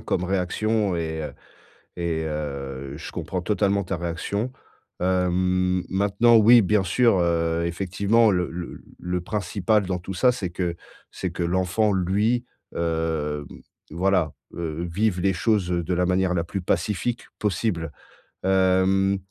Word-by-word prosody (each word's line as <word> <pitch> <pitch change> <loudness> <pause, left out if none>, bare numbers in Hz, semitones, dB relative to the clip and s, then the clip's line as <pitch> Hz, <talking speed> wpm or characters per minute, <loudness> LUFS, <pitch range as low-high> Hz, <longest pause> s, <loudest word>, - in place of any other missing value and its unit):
comme 90 - -1
réaction 95 +2 0
et 80 -1 -3
heu, 75 - -5 0.6
et 85 -2 -1
heu, 70 -3 -5
je - - -8
comprends 90 -2 -4
totalement 100 0 +1
ta 90 0 -2
réaction. 85 +7 -2 0.5
Hem, 90 0 +1
maintenant, 100 +5 +4
oui, 115 +1 +7
bien 105 +1 +2
sûr, 100 +2 +3
heu, 85 -1 +1
effectivement 100 +6 +2
le 90 -2 0
le 85 0 -6
l - - -10 0.2
le 90 0 -2
principal 100 +2 0
dans 90 -1 -1
tout 95 +2 -7
ça, 125 +6 +4
c'est 110 -7 -3
que 85 -1 -2 0.3
c'est 90 - -4
que 85 - -4
l'enfant, 95 +5 +1
lui, 105 +6 +1 0.3
hem, 80 -3 -1 0.5
voilà, 90 -1 +1 0.2
heu, 85 0 -4
vive 100 0 0
les 95 0 +2
choses, 100 -1 +1
heu, 85 -1 0
de 85 - -3
la 90 0 +1
manière 95 0 +2
la 85 - 0
plus 95 +2 -4
pacifique 105 +7 -1
possible. 90 -6 -1 0.5
Hem, 95 +1 +3
90 Hz, 145 wpm, -24 LUFS, 85-100 Hz, 0.6 s, oui